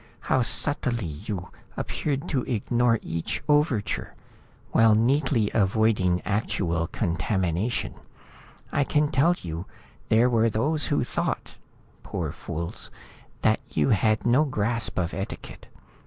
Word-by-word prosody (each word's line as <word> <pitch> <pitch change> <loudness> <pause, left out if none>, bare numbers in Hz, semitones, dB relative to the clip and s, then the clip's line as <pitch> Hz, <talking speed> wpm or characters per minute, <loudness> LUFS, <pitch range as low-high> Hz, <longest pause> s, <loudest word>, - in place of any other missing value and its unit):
How 130 - +2
subtly 120 -3 -1 0.2
you 95 -4 -4 0.3
appeared 140 -2 -2
to 135 - +1
ignore 120 0 +2
each 80 0 -3
overture, 145 -8 +1 0.6
while 110 -1 +5
neatly 125 -1 +2
avoiding 95 -3 +2
actual 85 -5 0
contamination. 95 +3 -1 0.8
I 145 - +2
can 150 +2 +1
tell 160 +5 +4
you, 85 +2 -6 0.4
there 115 +3 +5
were 115 -2 +3
those 145 +7 0
who - - +1
thought - - -2 0.5
poor - - -3
fools 85 +1 -6 0.5
that - - +3
you 75 -2 +1
had 110 +1 +2
no 125 +5 +5
grasp 115 -4 0
of 90 -1 -1
etiquette. 95 +1 -6
110 Hz, 115 wpm, -26 LUFS, 95-130 Hz, 0.8 s, while